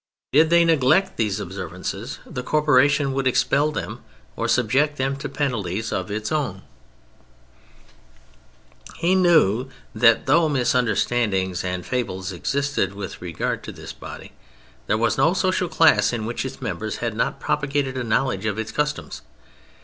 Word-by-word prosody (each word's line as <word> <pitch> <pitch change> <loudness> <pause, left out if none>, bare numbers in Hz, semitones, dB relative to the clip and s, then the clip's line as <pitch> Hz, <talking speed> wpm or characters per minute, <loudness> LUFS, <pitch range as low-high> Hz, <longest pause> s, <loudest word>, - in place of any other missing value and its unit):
Did 155 +3 +5
they 170 0 +5
neglect 160 +4 +3
these 105 -2 0
observances, 90 -2 -6
the 125 - -5
corporation 145 0 +3
would 135 -1 0
expel 145 +3 +2
them - - -5 0.3
or - - -2
subject 135 +5 +2
them 135 +1 0
to 140 - -5
penalties 110 -7 -2
of 95 +1 -3
its 105 +4 -3
own. 130 -12 -2 2.3
He 170 +2 +2
knew 155 - +3 0.2
that 115 -1 +4
though 155 +3 +4
misunderstandings 115 -7 +1
and 90 -1 -3
fables 95 -7 -3
existed 135 - -1
with 100 -2 -7
regard 85 -3 -3
to - - -7
this - - -9
body, - - -10 0.6
there 105 - +2
was 115 - +1
no 165 +4 +3
social 185 -1 0
class 105 -12 +4
in 115 -3 -3
which 120 +2 -3
its - - -7
members - - -3
had - - -3
not - - -1
propagated 145 -2 -1
a 130 - -2
knowledge 115 -3 0
of 105 0 -2
its 110 -1 -4
customs. 150 0 -3
125 Hz, 145 wpm, -23 LUFS, 105-150 Hz, 2.3 s, Did